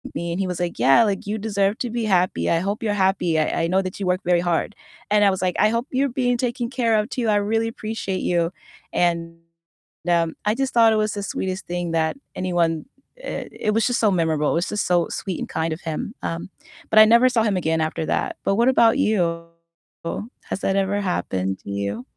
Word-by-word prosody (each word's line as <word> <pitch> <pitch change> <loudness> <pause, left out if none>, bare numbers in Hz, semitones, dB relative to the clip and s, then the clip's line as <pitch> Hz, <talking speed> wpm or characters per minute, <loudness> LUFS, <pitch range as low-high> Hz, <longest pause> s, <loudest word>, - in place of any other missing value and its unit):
me." 170 0 -3
And 175 - -3
he - - 0
was 180 -1 -4
like, 175 -1 -2
"Yeah," 135 - +6
like, 200 -2 -2
"you 215 +1 -2
deserve 200 -1 0
to 245 - -2
be 235 0 -2
happy, 185 -3 +1
I 165 - +3
hope 200 +5 -3
you're 210 -2 0
happy, 180 -4 +1
I 155 - 0
I - - +1
know 190 +2 +2
that 185 -1 -6
you 195 - -2
work 180 0 +1
very 175 -1 +3
hard." 175 +4 -1 0.4
And 210 0 +4
I - - +6
was 190 - -3
like, 180 -1 0
"I 210 +1 +5
hope 230 +4 -1
you're 270 +1 +1
being 245 0 0
taken 240 -1 -2
care 230 -5 +1
of, 210 +4 -2
too, 240 -5 -1
I 210 - +3
really 225 +2 0
appreciate 215 -4 -4
you." 170 0 +1 0.4
And, 170 -1 0 0.7
um, 165 -1 +2
I 210 - +3
just 270 0 -2
thought 230 -1 +6
it - - +2
was 215 - -2
the 205 -1 -4
sweetest 190 -1 -3
thing 175 -1 -3
that 160 +6 0 0.2
anyone, 170 -4 0 0.4
eh - - -5 0.2
It 210 - +3
was 225 +3 +2
just 245 - 0
so 210 -2 +4
memorable, 160 -4 +1
it - - 0
was 175 - -2
just 210 0 -1
so 175 -2 +2
sweet 190 -4 -4
and - - -4
kind 160 0 -2
of 160 - -7
him, 165 +7 -4
um, 165 +3 -4 0.4
but 215 - +5
I 215 - +10
never 235 +3 +5
saw 230 -3 +2
him 210 -3 +1
again 160 -2 0
after 155 0 -2
that, - - -1
but 195 - +1
what 235 +3 +3
about 230 -3 +4
you? 170 -5 +1 1.0
Has 195 - -3
that 195 - 0
ever 200 +1 0
happened 95 - -2
to - - -9
you? 100 +5 -3
190 Hz, 235 wpm, -22 LUFS, 170-220 Hz, 1.0 s, I